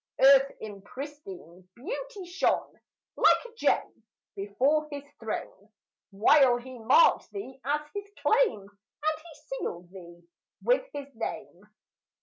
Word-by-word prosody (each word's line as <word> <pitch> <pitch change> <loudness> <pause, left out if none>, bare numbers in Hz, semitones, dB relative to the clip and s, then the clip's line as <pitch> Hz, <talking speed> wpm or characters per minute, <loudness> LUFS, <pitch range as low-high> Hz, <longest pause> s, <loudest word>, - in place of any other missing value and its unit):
Earth 270 0 +7
in 205 -2 -8
pristine 195 - -10
beauty 415 - -6
shone, 355 +2 0 0.4
Like - - +4
a 480 - -11
gem, 460 - 0 0.3
before 260 +10 +1
his 285 -1 -6 0.2
throne, 215 -2 -6 0.4
While 245 +5 +5
he 250 0 -10
marked 260 - +4
thee, 270 -10 -8
as 295 +2 0
his 405 0 -6
claim 445 - +3
And 295 +11 -5
he 335 0 -13 0.3
sealed 175 - -5
thee 175 -2 -13 0.4
with - - +3
his 280 -1 -8
name. 215 -4 -6
265 Hz, 125 wpm, -28 LUFS, 205-310 Hz, 0.4 s, Earth